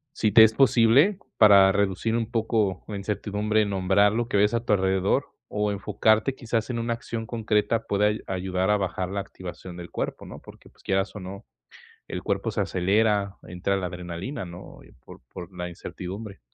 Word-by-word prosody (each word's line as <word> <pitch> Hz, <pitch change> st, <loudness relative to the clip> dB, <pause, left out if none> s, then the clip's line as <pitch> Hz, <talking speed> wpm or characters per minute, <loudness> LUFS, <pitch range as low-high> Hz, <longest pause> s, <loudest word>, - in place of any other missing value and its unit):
sí 110 Hz, -, +1 dB
te 110 Hz, +2 st, +9 dB
es 110 Hz, 0 st, +5 dB
posible, 135 Hz, -, +4 dB, 0.2 s
para 100 Hz, -3 st, +7 dB
reducir 100 Hz, +2 st, 0 dB
un 115 Hz, -1 st, -2 dB
poco 110 Hz, -5 st, 0 dB
la 105 Hz, -, -5 dB
incertidumbre, 105 Hz, +1 st, -1 dB
nombrar 100 Hz, +1 st, +2 dB
lo 115 Hz, +2 st, -1 dB
que 110 Hz, -, 0 dB
ves 105 Hz, +2 st, +3 dB
a 115 Hz, 0 st, 0 dB
tu 110 Hz, -, +2 dB
alrededor, 95 Hz, -1 st, +1 dB, 0.2 s
o 105 Hz, 0 st, -1 dB
enfocarte, 110 Hz, +5 st, +1 dB
quizás, 115 Hz, -2 st, -2 dB
en 120 Hz, -2 st, -2 dB
una 115 Hz, 0 st, -1 dB
acción 115 Hz, -1 st, -5 dB
concreta, 115 Hz, 0 st, 0 dB
puede 100 Hz, +1 st, +1 dB
ay 105 Hz, +1 st, -1 dB
ayudar 95 Hz, 0 st, -1 dB
a 105 Hz, -, +4 dB
bajar 95 Hz, -1 st, -3 dB
la 100 Hz, +1 st, -3 dB
activación 95 Hz, -2 st, -9 dB
del 85 Hz, -1 st, -8 dB
cuerpo, -, -, -4 dB
¿no? -, -, -10 dB
Porque, -, -, -15 dB
pues, -, -, -26 dB
quieras 95 Hz, +2 st, -1 dB
o -, -, -6 dB
no, 100 Hz, +3 st, -9 dB, 0.6 s
el -, -, -5 dB
cuerpo -, -, -1 dB
se -, -, -1 dB
acelera, 100 Hz, +2 st, +1 dB
entra 90 Hz, +3 st, -2 dB
la 95 Hz, -2 st, -2 dB
adrenalina, 90 Hz, +7 st, -6 dB
¿no?, 90 Hz, 0 st, -11 dB
y -, -, -18 dB
por -, -, -13 dB
por 90 Hz, +1 st, -9 dB
la 90 Hz, 0 st, -4 dB
incertidumbre. 95 Hz, +4 st, -8 dB
100 Hz, 190 wpm, -25 LUFS, 95-110 Hz, 0.6 s, te